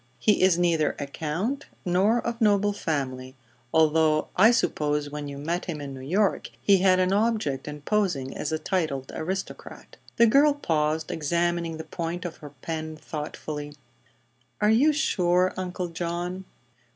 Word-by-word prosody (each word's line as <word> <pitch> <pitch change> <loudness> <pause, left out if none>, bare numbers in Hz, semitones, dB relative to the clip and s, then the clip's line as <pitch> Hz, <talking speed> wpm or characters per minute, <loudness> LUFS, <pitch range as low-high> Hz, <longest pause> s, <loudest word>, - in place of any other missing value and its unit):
He 210 -3 +2
is 185 -2 +5
neither 170 -3 +2
a 145 - -3
count 170 - -3 0.2
nor 195 +6 +2
of 235 0 -3
noble 205 -1 +3
family, 130 -7 -3 0.4
although 155 -1 +3
I 210 +5 +7
suppose 150 - 0
when 150 0 -5
you 140 0 -7
met 165 +5 -2
him 165 -5 -4
in 140 -1 -6
New 135 - -8
York 190 +9 0
he 200 -1 +4
had 185 0 +4
an 185 +1 +2
object 210 - 0
in 150 0 -7
posing 165 -9 -1
as - - -3
a 160 - 0
titled 155 -6 -2
aristocrat." 190 +4 -6 0.2
The 235 - +6
girl 280 +5 +5
paused, 155 - -1
examining 170 +1 -1
the 160 - -6
point 170 +2 -5
of 170 - -5
her 150 - -10
pen 160 -1 -4
thoughtfully. 150 -1 -6 0.8
"Are 210 0 +3
you 270 +8 +5
sure, 185 - +2
Uncle 180 -1 -4
John?" 175 +2 -4
170 Hz, 155 wpm, -26 LUFS, 150-195 Hz, 0.8 s, I